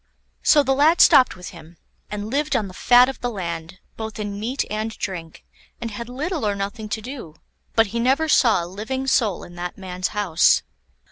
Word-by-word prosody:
So 295 -2 +5
the 270 0 +1
lad 305 +5 +4
stopped 255 - +6
with 180 0 -9
him, 170 -1 -14 0.3
and 210 +1 -5
lived 295 +3 0
on 210 - 0
the 185 - -10
fat 245 +6 +5
of 270 - -5
the 245 - -1
land, 170 -4 -5 0.2
both 220 0 -6
in 205 -1 -4
meat 245 +6 -2
and 215 +1 -2
drink, 170 -5 -6 0.3
and 230 -1 -5
had 235 +3 -7
little 305 +5 -3
or 205 -1 0
nothing 205 +2 -5
to 220 - -3
do; 245 - -8 0.4
but 225 - +5
he 235 - -1
never 270 +6 +2
saw 230 - +4
a - - -5
living 220 +9 -4
soul 225 -8 +1
in 175 - -12
that 175 0 -5
man's 185 -1 -3
house. 195 -6 +2
215 Hz, 200 wpm, -22 LUFS, 185-255 Hz, 0.4 s, stopped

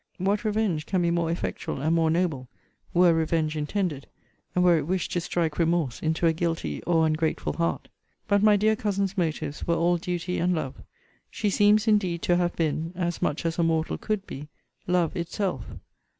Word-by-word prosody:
What 200 +4 0
revenge 210 -8 0
can 185 -2 +1
be 170 - +2
more 170 -1 0
effectual, 170 -4 -3
and 160 +4 +1
more 165 -1 +3
noble, 160 -7 0 0.4
were 175 -2 +5
revenge 160 -1 0
intended, 150 -1 -2 0.5
and 180 - +3
were 175 -1 +6
it 145 - -5
wished 185 +1 -1
to 175 - 0
strike 165 -2 -1
remorse 165 -6 +1
into 160 +1 0
a 165 - +4
guilty 165 0 -2
or 165 -2 +3
ungrateful 155 0 0
heart! 170 0 -1 0.4
But 205 -1 +3
my 210 0 +6
dear 215 +2 +3
cousin's 200 -2 -1
motives 160 -5 -2
were 170 - +2
all 175 +1 +2
duty 180 0 -3
and 180 +1 +2
love. 135 -5 -3 0.6
She 210 -2 -1
seems 210 +2 +4
indeed 190 -6 +2
to 175 - +3
have 175 -1 0
been, 165 +1 -1
as 175 -1 -2
much 150 - -1
as 165 +1 -1
a - - +4
mortal 160 -1 0
could 210 -2 -2
be, 145 -4 -8 0.4
LOVE 180 -2 +1
itself. 175 +3 -2
170 Hz, 185 wpm, -26 LUFS, 160-185 Hz, 0.6 s, were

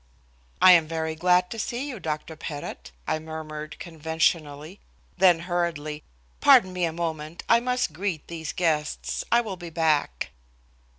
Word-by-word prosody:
"I 185 - +10
am 165 -3 +6
very 160 0 -2
glad 180 +2 +2
to 225 - -5
see 245 +5 -3
you, 250 -7 -6
Dr. 155 -1 -4
Pettit," 145 - -7 0.2
I 155 - 0
murmured 155 -1 -7
conventionally, 160 0 -1 0.4
then 180 -3 +5
hurriedly: 165 -4 -2 0.4
"Pardon 185 -1 +6
me 180 -1 0
a 165 - -1
moment, 160 -1 -4
I 230 - +6
must 250 -7 -1
greet 175 -2 -3
these 165 -2 -5
guests. 155 -4 -1
I 235 - +5
will 205 -5 -6
be 175 -1 -8
back." 155 - 0
165 Hz, 145 wpm, -26 LUFS, 155-180 Hz, 0.4 s, I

